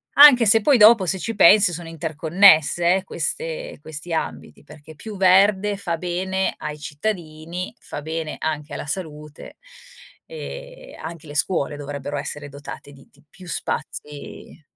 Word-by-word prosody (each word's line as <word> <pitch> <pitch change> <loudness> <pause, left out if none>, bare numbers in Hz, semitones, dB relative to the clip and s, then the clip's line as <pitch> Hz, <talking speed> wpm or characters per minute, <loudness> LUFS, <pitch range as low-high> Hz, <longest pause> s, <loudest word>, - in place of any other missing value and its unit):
anche 280 -5 +8
se 225 +1 +6
poi 275 +3 +4
dopo, 215 -2 +6
se 190 +3 0
ci 225 +3 -4
pensi, 200 0 +6
sono 170 0 -7
interconnesse, 165 +1 +3
eh, 190 - -5
queste 165 -1 -4
questi 155 +2 -8
ambiti, 160 - -5
perché 150 +1 -15
più 210 +6 -9
verde 195 +2 +3
fa 170 -4 -3
bene 185 +2 -2
ai 150 0 -7
cittadini, 165 +1 -5
fa - - -8
bene 160 0 -5
anche 150 -2 -4
alla - - -6
salute 150 -3 -7 0.7
e - - -10
anche 165 -1 -8
le 145 - -10
scuole 145 -2 -1
dovrebbero 145 0 -6
essere 145 0 -5
dotate 145 0 -10
di 135 - -18
di 145 - -25
più 185 -2 -15
spazi, 150 0 -5
165 Hz, 145 wpm, -22 LUFS, 150-195 Hz, 0.7 s, anche